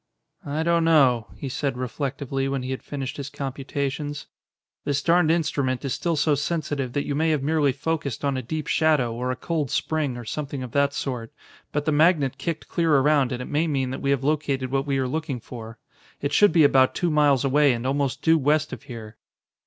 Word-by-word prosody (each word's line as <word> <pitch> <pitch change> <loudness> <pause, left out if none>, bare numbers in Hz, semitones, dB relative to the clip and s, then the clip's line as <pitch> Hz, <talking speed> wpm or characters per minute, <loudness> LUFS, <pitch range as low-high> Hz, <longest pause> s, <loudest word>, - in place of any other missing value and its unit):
"I 150 +3 -1
don't 170 0 +2
know," 135 -9 +4
he 140 - -6
said 135 0 -2
reflectively 135 +1 -3
when 135 -1 -2
he 130 - -4
had 130 - -4
finished 140 0 -5
his 140 -1 -5
computations. 140 +1 -4 0.6
"This 140 0 -1
darned 170 -1 +4
instrument 140 -5 0
is 135 - -1
still 170 -1 -1
so 150 0 +2
sensitive 145 -3 -2
that 145 - -1
you 145 - -2
may 160 +3 +1
have 150 -3 +1
merely 150 -1 +2
focused 145 -1 -3
on 140 -1 +1
a 130 - -2
deep 155 +5 -4
shadow 150 -7 +2
or 125 +2 -3
a 130 - -1
cold 155 0 -2
spring 150 -4 -1
or 120 - -8
something 140 +1 -4
of 125 - -7
that 140 +1 +1
sort, 120 -4 -4 0.4
but 150 0 -2
the 155 - +2
magnet 145 -3 +3
kicked 160 +3 -4
clear 165 -3 +2
around 140 -1 +3
and 125 0 -3
it - - -8
may 155 +3 0
mean 135 -4 -1
that 130 - -5
we 140 - -1
have 140 -1 +1
located 140 -3 0
what 135 +1 0
we 140 -1 +1
are 130 -1 0
looking 145 -2 -3
for. 115 -1 -9 0.4
It 140 +1 -2
should 205 +3 +6
be 160 -1 +5
about 135 -2 +4
two 175 -2 0
miles 145 -3 +3
away 145 +1 +4
and 120 0 -3
almost 140 +1 -1
due 160 0 +4
west 150 +2 +1
of - - -7
here." 115 -6 -10
140 Hz, 215 wpm, -24 LUFS, 130-155 Hz, 0.6 s, should